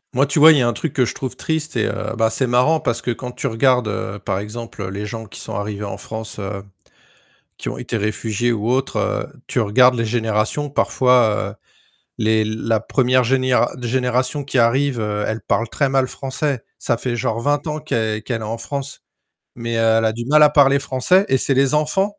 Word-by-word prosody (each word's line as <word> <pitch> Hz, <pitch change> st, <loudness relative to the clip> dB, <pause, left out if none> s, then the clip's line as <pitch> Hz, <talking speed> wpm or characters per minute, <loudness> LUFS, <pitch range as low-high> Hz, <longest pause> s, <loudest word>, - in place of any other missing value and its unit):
Moi 135 Hz, +2 st, +3 dB
tu 140 Hz, -, -1 dB
vois, 155 Hz, +2 st, +9 dB
il 150 Hz, -, +4 dB
y -, -, +2 dB
a 120 Hz, -, +2 dB
un 120 Hz, -, +1 dB
truc 160 Hz, -, -4 dB
que 130 Hz, -, +2 dB
je -, -, -4 dB
trouve 130 Hz, -2 st, -5 dB
triste, 160 Hz, -2 st, -3 dB
et 110 Hz, -, +1 dB
heu, 110 Hz, +1 st, -3 dB
bah, 110 Hz, -1 st, +2 dB
c'est 120 Hz, +4 st, 0 dB
marrant 125 Hz, +7 st, +3 dB
parce 120 Hz, -5 st, -1 dB
que, -, -, -4 dB
quand 125 Hz, +2 st, -4 dB
tu 135 Hz, -, -4 dB
regardes, 125 Hz, 0 st, +2 dB
heu, 105 Hz, 0 st, -4 dB
par -, -, -1 dB
exemple, 105 Hz, +1 st, -6 dB
heu, 95 Hz, -, -4 dB
les 100 Hz, +2 st, -5 dB
gens 115 Hz, +1 st, -6 dB
qui 105 Hz, -, -10 dB
sont -, -, -6 dB
arrivés 100 Hz, +1 st, -4 dB
en 100 Hz, -1 st, -5 dB
France, 110 Hz, +2 st, -6 dB
heu, 100 Hz, -1 st, -5 dB, 1.0 s
qui -, -, -5 dB
ont -, -, -4 dB
été 115 Hz, -, -3 dB
réfugiés 110 Hz, +2 st, -1 dB
ou 115 Hz, 0 st, -1 dB
autres, 130 Hz, +1 st, 0 dB
heu, -, -, -1 dB, 0.2 s
tu 125 Hz, -, -1 dB
regardes 125 Hz, +4 st, +4 dB
les 115 Hz, -2 st, -1 dB
générations, 110 Hz, +5 st, -1 dB
parfois 125 Hz, -6 st, +2 dB
heu, -, -, -11 dB, 0.7 s
les 110 Hz, 0 st, +2 dB
la 110 Hz, +1 st, -1 dB
1re 130 Hz, +2 st, +2 dB
généra 130 Hz, -1 st, +2 dB
génération 125 Hz, +3 st, -1 dB
qui 135 Hz, -3 st, 0 dB
arrive, 125 Hz, +1 st, +2 dB
heu, 105 Hz, -1 st, -2 dB
elle 110 Hz, +1 st, -3 dB
parle 115 Hz, -, 0 dB
très 140 Hz, +4 st, 0 dB
mal 135 Hz, -1 st, +2 dB
français. 135 Hz, 0 st, -3 dB, 0.2 s
Ça 120 Hz, -, 0 dB
fait 120 Hz, 0 st, -3 dB
genre 115 Hz, 0 st, -1 dB
20 145 Hz, +2 st, 0 dB
ans 155 Hz, 0 st, -3 dB
qu'elle 110 Hz, -7 st, -2 dB
qu'elle 120 Hz, -2 st, -3 dB
est -, -, -6 dB
en 115 Hz, +2 st, -4 dB
France, 140 Hz, +3 st, -6 dB, 0.5 s
mais 115 Hz, 0 st, -4 dB
elle 115 Hz, 0 st, +3 dB
a 110 Hz, -, +2 dB
du 120 Hz, +1 st, -6 dB
mal 150 Hz, +3 st, +5 dB
à -, -, +7 dB
parler 140 Hz, -1 st, +5 dB
français 140 Hz, +8 st, +2 dB
et 135 Hz, -, +3 dB
c'est 135 Hz, -, +1 dB
les 135 Hz, +1 st, +3 dB
enfants, 190 Hz, +7 st, 0 dB
120 Hz, 220 wpm, -20 LUFS, 110-135 Hz, 1.0 s, vois